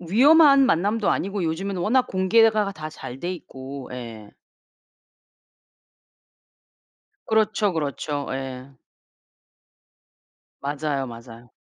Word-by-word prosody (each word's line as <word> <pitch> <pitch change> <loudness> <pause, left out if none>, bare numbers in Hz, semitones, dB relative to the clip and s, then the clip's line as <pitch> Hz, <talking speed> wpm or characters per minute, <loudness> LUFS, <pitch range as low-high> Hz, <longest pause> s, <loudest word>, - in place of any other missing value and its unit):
위험한 275 - +6
만남도 205 +2 +1
아니고 195 -1 -1
요즘에는 180 +4 -3
워낙 250 +7 +2
공개가 210 +2 +3
다 155 -4 -7
잘 130 -3 -9
돼있고. 140 -6 -7
예. 115 -4 -9 3.0
그렇죠, 215 -2 +1
그렇죠. 145 -2 -3
예. 130 0 -6 1.9
맞아요, 140 -1 -2
맞아요. 115 0 -12
160 Hz, 190 characters per minute, -23 LUFS, 135-210 Hz, 3.0 s, 위험한